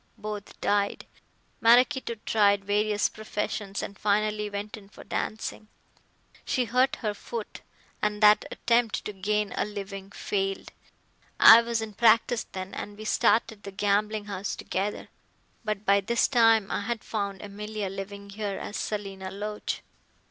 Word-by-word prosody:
Both 210 Hz, -1 st, -7 dB
died. 205 Hz, 0 st, 0 dB, 0.6 s
Maraquito 245 Hz, +1 st, +4 dB
tried 200 Hz, -2 st, +3 dB
various 210 Hz, +1 st, +2 dB
professions 210 Hz, -2 st, -4 dB
and 200 Hz, -, -6 dB
finally 210 Hz, 0 st, +1 dB
went 205 Hz, +1 st, -5 dB
in 200 Hz, -3 st, -14 dB
for -, -, -13 dB
dancing. 215 Hz, 0 st, -4 dB, 0.8 s
She 250 Hz, -, 0 dB
hurt 250 Hz, +3 st, +2 dB
her 210 Hz, -, +1 dB
foot, 220 Hz, +1 st, -7 dB, 0.4 s
and 210 Hz, 0 st, 0 dB
that 210 Hz, 0 st, +7 dB
attempt 235 Hz, -2 st, +1 dB
to 210 Hz, -, -4 dB
gain 210 Hz, +1 st, -1 dB
a -, -, +1 dB
living 195 Hz, -1 st, -6 dB
failed. 195 Hz, -1 st, -3 dB, 0.7 s
I 225 Hz, +1 st, +10 dB
was 230 Hz, -1 st, -1 dB
in 215 Hz, -1 st, -7 dB
practice 230 Hz, +1 st, +4 dB
then 185 Hz, 0 st, -7 dB
and 205 Hz, 0 st, -6 dB
we 215 Hz, -, -8 dB
started 220 Hz, -1 st, +2 dB
the 200 Hz, -, -8 dB
gambling 205 Hz, +2 st, 0 dB
house 200 Hz, -1 st, -4 dB
together. 195 Hz, +2 st, -3 dB, 0.5 s
But 215 Hz, -1 st, -3 dB
by 200 Hz, 0 st, +4 dB
this 235 Hz, +4 st, +2 dB
time 225 Hz, -5 st, +4 dB
I -, -, -1 dB
had 230 Hz, +2 st, -3 dB
found 200 Hz, -3 st, -3 dB
Emilia 210 Hz, 0 st, -5 dB
living 200 Hz, +1 st, -7 dB
here 205 Hz, -1 st, -3 dB
as 205 Hz, -, -5 dB
Selina 195 Hz, -3 st, -4 dB
Loach. 210 Hz, +2 st, -4 dB
210 Hz, 145 wpm, -27 LUFS, 200-220 Hz, 0.8 s, I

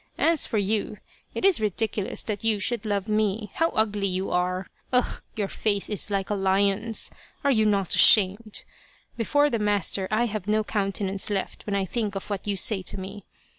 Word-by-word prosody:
As 330 Hz, -2 st, +3 dB
for 225 Hz, -, -1 dB
you, 210 Hz, +1 st, -1 dB, 0.4 s
it -, -, -1 dB
is 380 Hz, -, +4 dB
ridiculous 215 Hz, -1 st, -1 dB
that 210 Hz, -1 st, -4 dB
you 225 Hz, -2 st, +3 dB
should 235 Hz, +2 st, -1 dB
love 200 Hz, -1 st, -1 dB
me. 210 Hz, -1 st, 0 dB
How 330 Hz, 0 st, +1 dB
ugly 210 Hz, -5 st, 0 dB
you 185 Hz, +1 st, -2 dB
are! 180 Hz, +1 st, 0 dB, 0.3 s
Ugh! 250 Hz, -1 st, +1 dB
your 210 Hz, -3 st, -1 dB
face 205 Hz, 0 st, -1 dB
is 210 Hz, 0 st, -1 dB
like 195 Hz, 0 st, -2 dB
a -, -, +2 dB
lion's. 200 Hz, +3 st, 0 dB, 0.3 s
Are 280 Hz, -, +3 dB
you 220 Hz, -4 st, +3 dB
not 200 Hz, -3 st, +2 dB
ashamed. 210 Hz, +1 st, +5 dB, 0.5 s
Before 290 Hz, +5 st, +2 dB
the 230 Hz, -, 0 dB
master 205 Hz, -2 st, +1 dB
I 220 Hz, +3 st, +2 dB
have 215 Hz, -4 st, -4 dB
no 215 Hz, +1 st, +2 dB
countenance 195 Hz, -1 st, -2 dB
left 200 Hz, 0 st, -4 dB
when 200 Hz, -, -1 dB
I 195 Hz, -1 st, 0 dB
think 210 Hz, 0 st, -3 dB
of 195 Hz, +2 st, -6 dB
what 200 Hz, 0 st, -4 dB
you 200 Hz, -, 0 dB
say 195 Hz, +1 st, 0 dB
to 185 Hz, -, -3 dB
me. 195 Hz, +2 st, -8 dB
205 Hz, 190 wpm, -25 LUFS, 195-220 Hz, 0.5 s, ashamed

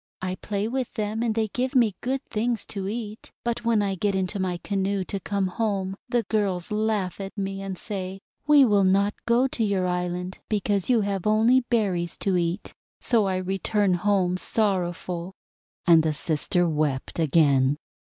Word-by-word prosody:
I 185 Hz, 0 st, -3 dB
play 200 Hz, +2 st, -3 dB
with 255 Hz, +1 st, -3 dB
them, 215 Hz, 0 st, -2 dB
and 230 Hz, -2 st, 0 dB
they 220 Hz, -1 st, 0 dB
give 255 Hz, +5 st, -2 dB
me 235 Hz, -5 st, +4 dB
good 260 Hz, +2 st, -1 dB
things 230 Hz, 0 st, -1 dB
to 195 Hz, -2 st, -3 dB
eat. 215 Hz, 0 st, -6 dB
But 235 Hz, 0 st, -2 dB
when 230 Hz, -3 st, +2 dB
I 195 Hz, -1 st, 0 dB
get 195 Hz, +1 st, 0 dB
into 190 Hz, +1 st, -1 dB
my 185 Hz, -2 st, -1 dB
canoe 195 Hz, +1 st, -1 dB
to 195 Hz, +2 st, -4 dB
come 200 Hz, 0 st, -1 dB
home, 195 Hz, -1 st, -1 dB
the 240 Hz, -1 st, +1 dB
girls 195 Hz, -6 st, -1 dB
laugh 210 Hz, -3 st, -1 dB
at 195 Hz, +2 st, -7 dB
me 195 Hz, 0 st, -3 dB
and 195 Hz, -1 st, -5 dB
say: 190 Hz, -2 st, -5 dB, 0.3 s
'We 295 Hz, -2 st, +7 dB
will 205 Hz, -4 st, +3 dB
not 200 Hz, +2 st, +3 dB
go 235 Hz, +2 st, +4 dB
to 235 Hz, -, -1 dB
your 200 Hz, -3 st, +1 dB
island 180 Hz, +1 st, -2 dB
because 205 Hz, -1 st, 0 dB
you 240 Hz, -3 st, +4 dB
have 200 Hz, -1 st, -2 dB
only 225 Hz, +4 st, +5 dB
berries 190 Hz, -8 st, 0 dB
to 195 Hz, -2 st, 0 dB
eat.' 175 Hz, +2 st, -1 dB, 0.3 s
So 230 Hz, -4 st, +3 dB
I 190 Hz, -, 0 dB
return 190 Hz, +1 st, +1 dB
home 185 Hz, 0 st, +1 dB
sorrowful"; 185 Hz, -3 st, -1 dB, 0.5 s
and 170 Hz, -2 st, +7 dB
the 160 Hz, -1 st, 0 dB
sister 165 Hz, +3 st, 0 dB
wept 150 Hz, -2 st, -1 dB
again. 145 Hz, -3 st, +3 dB
195 Hz, 175 wpm, -25 LUFS, 180-215 Hz, 0.5 s, We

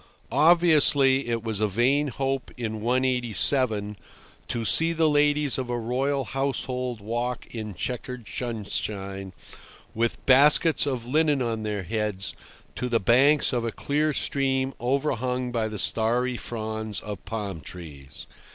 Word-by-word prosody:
Obviously 145 Hz, -4 st, +4 dB
it 115 Hz, -1 st, -2 dB
was 110 Hz, -3 st, -1 dB
a 110 Hz, -, +1 dB
vain 130 Hz, +8 st, +1 dB
hope 135 Hz, 0 st, -3 dB
in 110 Hz, -3 st, -5 dB
187– 120 Hz, -3 st, +3 dB, 0.5 s
to 115 Hz, -1 st, -3 dB
see 165 Hz, +10 st, +4 dB
the 160 Hz, -1 st, +1 dB
ladies 145 Hz, -2 st, +2 dB
of 130 Hz, -2 st, -5 dB
a 120 Hz, -, -2 dB
royal 130 Hz, +4 st, -2 dB
household 125 Hz, -1 st, -3 dB
walk 120 Hz, +3 st, -4 dB
in 110 Hz, -4 st, -6 dB
chequered 125 Hz, -, -6 dB
sunshine, 100 Hz, -4 st, -4 dB, 0.6 s
with 115 Hz, +1 st, -3 dB
baskets 145 Hz, +4 st, +5 dB
of 125 Hz, -4 st, -3 dB
linen 150 Hz, +2 st, +1 dB
on 115 Hz, -3 st, -3 dB
their 105 Hz, -2 st, -4 dB
heads, 105 Hz, -1 st, -3 dB, 0.4 s
to 125 Hz, -, -4 dB
the 115 Hz, -1 st, +1 dB
banks 130 Hz, +9 st, +3 dB
of 120 Hz, -2 st, -1 dB
a 115 Hz, -, -3 dB
clear 150 Hz, +5 st, -1 dB
stream 135 Hz, -1 st, 0 dB
overhung 125 Hz, -1 st, -2 dB
by 115 Hz, -2 st, -1 dB
the 110 Hz, -1 st, -7 dB
starry 120 Hz, +5 st, +1 dB
fronds 110 Hz, -3 st, -5 dB
of 105 Hz, -3 st, -8 dB
palm 100 Hz, -7 st, -5 dB
trees. 75 Hz, -3 st, -9 dB
120 Hz, 135 wpm, -25 LUFS, 110-135 Hz, 0.6 s, baskets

